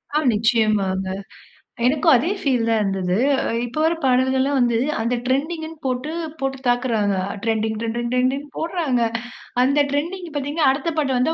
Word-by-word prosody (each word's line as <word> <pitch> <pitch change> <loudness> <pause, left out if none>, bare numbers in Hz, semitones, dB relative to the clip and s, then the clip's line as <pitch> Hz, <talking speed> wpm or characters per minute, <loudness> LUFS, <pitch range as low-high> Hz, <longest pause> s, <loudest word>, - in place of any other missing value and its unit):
ஆ, - - +5 0.2
நிச்சயமாங்க. 210 -4 +1 0.8
எனக்கும் 300 +4 +4
அதே 250 +8 +1
ஃபீல் 250 -5 +1
தான் 225 -1 +3
இருந்தது. 190 -2 0 0.5
இப்போ 245 +5 -5
வர்ற 325 +1 +3
பாடல்கள்லாம் 260 +2 +2
வந்து, 240 -2 +2 0.2
அந்த 235 +2 0
ட்ரெண்டிங்ன்னு 315 +5 -2
போட்டு, 260 +4 -2 0.3
போட்டு 270 0 -2
தாக்குறாங்க. 230 -5 +1 0.3
ட்ரெண்டிங், 220 -1 0
ட்ரெண்டிங், 235 +1 -2
ட்ரெண்டிங்னு 265 +3 0
போட்றாங்க. 320 -7 0 0.6
அந்த 280 +3 +3
ட்ரெண்டிங் 340 +6 -2
பார்த்தீங்கன்னா, 290 +1 +1
அடுத்த 305 +5 -2
பாட்டு 270 -3 +1
வந்தா 255 +6 +2
255 Hz, 140 wpm, -21 LUFS, 230-290 Hz, 0.8 s, ஆ